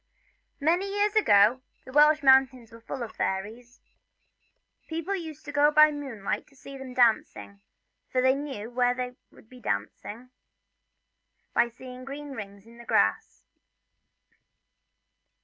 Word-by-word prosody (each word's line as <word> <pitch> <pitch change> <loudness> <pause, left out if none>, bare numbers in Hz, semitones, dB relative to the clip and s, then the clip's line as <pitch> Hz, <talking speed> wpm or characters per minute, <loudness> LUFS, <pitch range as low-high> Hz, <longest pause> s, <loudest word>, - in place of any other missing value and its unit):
MANY 350 +7 +1
years 410 +1 0
ago 240 - +4 0.2
the 260 - -11
Welsh 300 +2 +5
mountains 265 -3 +4
were 230 0 -14
full 250 +2 -6
of 225 - -9
fairies. 225 +6 -4 1.1
People 330 +4 -3
used 315 -4 -8
to 290 - -6
go 290 0 +4
by 305 0 +6
moonlight 265 -9 -5
to 275 - -24
see 275 +1 -11
them 265 -2 -9
dancing, 105 - +1 0.5
for 255 - +1
they 260 +1 +4
knew 270 -6 -6
where 245 0 +1
they 250 0 -4 0.2
would - - -20
dance 100 - -3 1.5
by 240 - +3
seeing 250 +1 -11
green 285 +2 -8
rings 200 -5 -9
in 235 +1 -17
the - - -11
grass. - - 0
260 Hz, 130 wpm, -27 LUFS, 230-295 Hz, 1.5 s, by